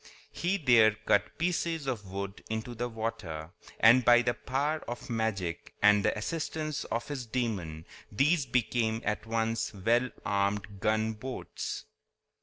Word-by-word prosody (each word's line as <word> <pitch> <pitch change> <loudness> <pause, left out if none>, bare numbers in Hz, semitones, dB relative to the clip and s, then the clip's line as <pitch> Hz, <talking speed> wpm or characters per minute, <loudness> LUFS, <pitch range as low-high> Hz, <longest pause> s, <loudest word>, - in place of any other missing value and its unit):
He 180 +3 0
there 120 - +5
cut 105 - +2
pieces 165 -2 0
of 110 -8 -3
wood 100 0 -5
into 110 +2 -3
the 120 +1 -3
water, 90 -9 -4 0.3
and 120 +3 +7
by 120 0 +6
the 120 0 +1
power 145 +6 -1
of 120 +1 -6
magic 100 -7 -2
and 105 -1 +5
the - - +1
assistance 155 +4 -3
of 115 - -3
his 135 -5 -5
demon 100 -10 -2 0.3
these 140 +7 +2
became 115 -2 0
at 105 +1 -2
once 115 0 0
well 120 +6 +2 0.2
armed 100 0 -1
gunboats. 110 +4 -2
115 Hz, 135 wpm, -30 LUFS, 105-130 Hz, 0.3 s, and